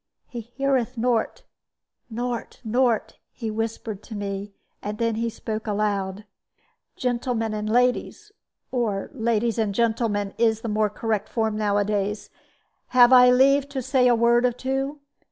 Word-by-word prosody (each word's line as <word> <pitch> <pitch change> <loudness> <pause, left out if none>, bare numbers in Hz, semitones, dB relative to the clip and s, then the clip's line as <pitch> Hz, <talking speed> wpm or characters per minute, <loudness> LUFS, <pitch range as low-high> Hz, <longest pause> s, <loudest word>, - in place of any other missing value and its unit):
"He 240 -2 -6
heareth 255 +1 -1
nort, 240 - 0 0.7
nort, 240 +1 -4
nort," 235 0 0
he 225 -3 -5
whispered 220 -1 -4
to 220 - -9
me; 200 0 -4 0.3
and 210 +1 -4
then 230 0 0
spoke 220 0 -5
aloud: 205 -1 -1 0.7
"Gentlemen 235 -3 -1
and 215 0 -3
ladies 250 - 0 0.4
or 220 -6 -1
ladies 230 -2 0
and 205 -3 0
gentlemen, 220 -3 0
is 225 -1 +2
the 230 - -4
more 215 0 +1
correct 215 0 -2
form 220 -2 -1
nowadays 205 0 -1 0.6
have 250 0 +6
I 250 0 +8
leave 275 +2 +4
to 275 -2 -3
say 260 0 +3
a 240 - +5
word 235 +1 +3
or 250 - +3
two? 270 +3 -3
230 Hz, 135 wpm, -24 LUFS, 215-250 Hz, 0.7 s, I